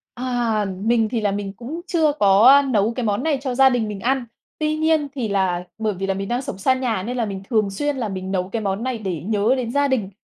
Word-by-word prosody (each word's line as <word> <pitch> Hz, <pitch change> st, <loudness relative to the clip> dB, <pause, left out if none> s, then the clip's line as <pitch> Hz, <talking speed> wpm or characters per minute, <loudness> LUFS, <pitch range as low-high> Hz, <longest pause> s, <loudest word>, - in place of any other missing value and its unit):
À, 240 Hz, -4 st, -1 dB, 0.2 s
mình 225 Hz, -1 st, +2 dB
thì 230 Hz, +1 st, -2 dB
là 205 Hz, -2 st, +1 dB
mình 200 Hz, -1 st, -4 dB
cũng 250 Hz, -, -7 dB
chưa 315 Hz, -4 st, +2 dB
có, 205 Hz, -4 st, +4 dB
a, 280 Hz, +1 st, +8 dB
nấu 225 Hz, -4 st, +1 dB
cái 250 Hz, -1 st, -3 dB
món 205 Hz, +2 st, 0 dB
này 300 Hz, -2 st, +1 dB
cho 260 Hz, -3 st, -3 dB
gia 270 Hz, +1 st, +6 dB
đình 245 Hz, -4 st, 0 dB
mình 205 Hz, -2 st, -6 dB
ăn, 260 Hz, +2 st, 0 dB, 0.3 s
tuy 310 Hz, 0 st, 0 dB
nhiên 315 Hz, -2 st, +1 dB
thì 250 Hz, -6 st, -2 dB
là 190 Hz, -3 st, 0 dB
bởi 215 Hz, -2 st, -1 dB
vì 195 Hz, +1 st, -3 dB
là 195 Hz, -, 0 dB
mình 195 Hz, +1 st, -4 dB
đang 245 Hz, +2 st, -1 dB
sống 190 Hz, -, -6 dB
xa 260 Hz, +7 st, +2 dB
nhà 240 Hz, -7 st, -1 dB
nên 245 Hz, +5 st, -4 dB
là 235 Hz, -, 0 dB
mình 195 Hz, -2 st, -5 dB
thường 215 Hz, -4 st, +2 dB
xuyên 290 Hz, +8 st, -2 dB
là 235 Hz, -4 st, -2 dB
mình 190 Hz, -1 st, -5 dB
nấu 185 Hz, -1 st, -1 dB
cái 220 Hz, +2 st, -3 dB
món 195 Hz, +2 st, -2 dB
này 255 Hz, -3 st, -2 dB
để 185 Hz, -7 st, -4 dB
nhớ 215 Hz, +3 st, +2 dB
đến 240 Hz, -3 st, -3 dB
gia 285 Hz, +1 st, +2 dB
đình 220 Hz, -8 st, -1 dB
230 Hz, 270 wpm, -21 LUFS, 200-260 Hz, 0.3 s, a